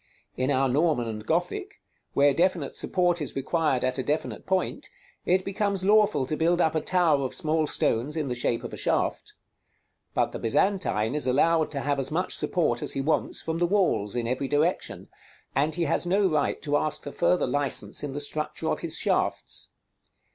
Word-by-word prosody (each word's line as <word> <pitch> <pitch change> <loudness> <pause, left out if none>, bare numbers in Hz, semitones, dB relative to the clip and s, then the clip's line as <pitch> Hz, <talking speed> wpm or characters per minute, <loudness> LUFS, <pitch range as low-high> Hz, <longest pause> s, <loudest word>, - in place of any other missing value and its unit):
In 130 +1 -1
our 135 -1 +2
Norman 140 -2 +1
and 110 -1 -5
Gothic, 180 - -2 0.4
where 140 0 +5
definite 170 -2 0
support 175 -2 0
is 145 - -3
required 135 -1 0
at 130 +1 0
a - - -1
definite 150 +4 -3
point, 190 -1 -1 0.4
it 185 +1 +2
becomes 200 -1 -1
lawful 210 -8 +4
to 155 - -2
build 170 +3 +2
up 160 -3 +3
a 160 - 0
tower 170 -6 +2
of 130 - -2
small 155 -2 +1
stones 140 +6 0
in 150 -3 -1
the 125 - -1
shape 120 -1 -1
of - - -7
a - - -5
shaft. - - -1 0.8
But - - +1
the - - -6
Byzantine 115 - +1
is 150 -3 -1
allowed 160 +5 +3
to 140 -2 -3
have 145 0 0
as 135 0 -1
much 180 +4 0
support 155 -9 0
as - - -1
he - - -2
wants 155 +3 -1
from 160 0 -2
the 175 - +2
walls 170 - +1
in 120 -1 -1
every 130 +3 -1
direction, 150 +5 0 0.5
and 150 +3 +1
he 175 - 0
has 175 - 0
no 195 +2 +3
right 155 -5 0
to 145 0 +1
ask 155 0 -2
for 145 - -6
further 180 - +2
license 145 -1 -1
in 145 - -3
the 140 - -4
structure 150 +1 -3
of - - -1
his - - -4
shafts. - - -1
155 Hz, 195 wpm, -26 LUFS, 135-175 Hz, 0.8 s, where